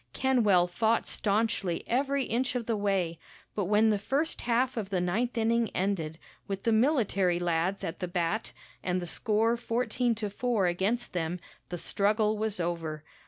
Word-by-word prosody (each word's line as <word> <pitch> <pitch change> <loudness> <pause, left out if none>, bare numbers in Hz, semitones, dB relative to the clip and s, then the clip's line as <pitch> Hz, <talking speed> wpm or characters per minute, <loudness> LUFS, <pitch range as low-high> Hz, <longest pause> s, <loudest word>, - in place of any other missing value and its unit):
Kenwell 220 -9 +3
fought 220 +6 +1
staunchly 205 -4 0
every 275 +3 +1
inch 250 +2 -1
of 240 -2 -1
the 230 - 0
way, 190 -5 0 0.3
but 205 - -1
when 210 +3 +4
the 205 - +1
first 280 +9 -1
half 245 +2 +1
of 215 -4 -3
the 190 -2 0
ninth 220 +8 -1
inning 230 0 +2
ended, 180 -5 -1 0.3
with 195 -1 -4
the 230 - +2
military 220 - +2
lads 175 +2 0
at 165 - -4
the 180 - -2
bat 175 +4 -1 0.3
and 180 0 0
the 175 - -4
score 220 +6 +1
fourteen 240 0 0
to 215 -1 -3
four 230 -2 0
against 195 +7 0
them, 175 0 -2 0.3
the 175 - -4
struggle 210 +4 +1
was 215 -2 -2
over. 165 -3 -3
210 Hz, 165 wpm, -29 LUFS, 180-230 Hz, 0.3 s, when